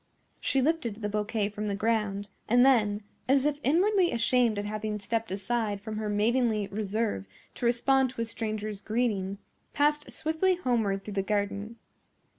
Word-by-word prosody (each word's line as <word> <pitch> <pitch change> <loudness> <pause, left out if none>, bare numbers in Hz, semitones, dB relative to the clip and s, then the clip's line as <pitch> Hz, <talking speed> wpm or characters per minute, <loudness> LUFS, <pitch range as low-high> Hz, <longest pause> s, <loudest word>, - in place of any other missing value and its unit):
She 270 -1 +1
lifted 295 -8 0
the 210 -1 -4
bouquet 210 0 -1
from 210 0 -4
the 200 - -1
ground, 210 -2 0 0.2
and 245 +3 +6
then, 210 -6 +3 0.3
as 270 0 +4
if 295 -1 +1
inwardly 360 - +3
ashamed 235 -1 +2
at 205 - -2
having 215 0 -3
stepped 225 +2 -2
aside 205 +1 -1
from 215 +1 -6
her 215 -1 -2
maidenly 215 0 +1
reserve 210 - -2 0.3
to 240 - -1
respond 265 +2 +3
to 240 - -5
a - - 0
stranger's 215 -2 -4
greeting, 210 -4 -1 0.4
passed 295 0 +1
swiftly 320 +4 +1
homeward 225 - 0
through 210 - -7
the 195 - +1
garden. 205 +2 -2
220 Hz, 160 wpm, -28 LUFS, 205-250 Hz, 0.4 s, and